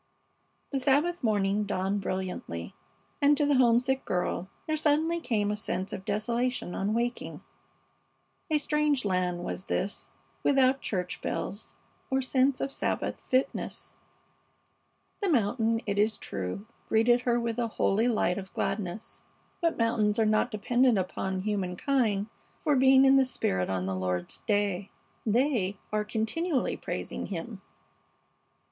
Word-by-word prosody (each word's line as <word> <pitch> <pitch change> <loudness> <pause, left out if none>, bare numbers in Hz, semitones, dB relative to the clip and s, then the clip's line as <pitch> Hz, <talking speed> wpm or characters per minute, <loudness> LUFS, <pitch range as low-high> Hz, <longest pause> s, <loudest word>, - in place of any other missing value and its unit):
The 275 - 0
Sabbath 290 +6 +2
morning 205 -2 +2
dawned 195 0 -1
brilliantly, 185 - -4 0.5
and 290 0 +5
to 295 - +3
the 290 - +3
homesick 255 +2 +3
girl 180 0 -2 0.2
there 310 - 0
suddenly 310 +2 +2
came 210 -9 0
a - - 0
sense 195 -2 -3
of 190 - -6
desolation 235 -1 -1
on 205 +3 -1
waking. 240 +1 -2 1.1
A 310 - +3
strange 295 -3 +1
land 180 -2 0
was 185 - -5
this, 200 - -2 0.3
without 270 -1 +3
church 180 -3 -3
bells 200 +3 -4 0.3
or 265 -1 +2
sense 260 0 +2
of 275 - -1
Sabbath - - -2
fitness. 260 +1 -1 1.3
The 400 - 0
mountain, 230 -3 +2
it 200 -1 -1
is 215 +1 +2
true, 95 - -5 0.2
greeted 240 +2 +4
her 240 -1 +1
with 235 0 -2
a 235 - +1
holy 215 +5 +3
light 210 -5 +1
of 190 0 -10
gladness, 200 +1 -3 0.4
but 335 -1 +1
mountains 220 -2 +2
are 225 - +3
not 215 +3 +2
dependent 240 +2 +2
upon 190 0 -2
humankind 205 +2 0 0.3
for 300 -3 +2
being 265 0 +6
in 270 0 +6
the 270 - +6
spirit 95 - -1
on 95 -1 -1
the 95 - -2
Lord's 90 -1 -2
day. 205 -2 +1 0.4
They 220 -4 +1 0.2
are 210 0 +1
"continually 250 +9 -1
praising - - -4
Him." 195 +3 -6
220 Hz, 140 wpm, -29 LUFS, 195-265 Hz, 1.3 s, being